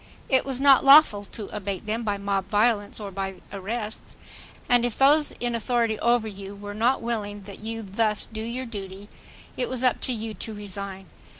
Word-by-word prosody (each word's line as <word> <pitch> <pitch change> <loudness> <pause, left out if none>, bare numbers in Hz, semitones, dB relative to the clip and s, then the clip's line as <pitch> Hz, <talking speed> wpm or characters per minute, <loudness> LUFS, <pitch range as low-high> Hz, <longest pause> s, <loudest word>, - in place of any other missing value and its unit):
It 260 -2 +3
was 265 -2 -1
not 275 -1 +6
lawful 275 -8 +7
to 210 +1 -7
abate 200 -1 -4
them 220 +2 -1
by 205 -3 -1
mob 200 -1 -1
violence, 210 -1 +1
or 205 -2 -6
by 195 0 -4 0.2
arrests. 210 +3 -5 0.5
And 245 -1 +4
if 245 -2 -1
those 290 +3 +5
in 240 -1 -3
authority 230 -1 0
over 235 -1 +2
you 200 -1 -8
were 205 0 -8
not 235 +5 +1
willing 205 -3 -3
that 200 0 -11
you 225 +1 -5
thus 210 +2 0
do 220 -1 -7
your 240 +3 -4
duty, 200 -3 -8 0.5
it 250 - -1
was 255 0 -3
up 255 - +2
to - - -2
you 225 -2 -4
to 220 0 -6
resign. 200 -1 -6
220 Hz, 190 wpm, -25 LUFS, 200-240 Hz, 0.5 s, lawful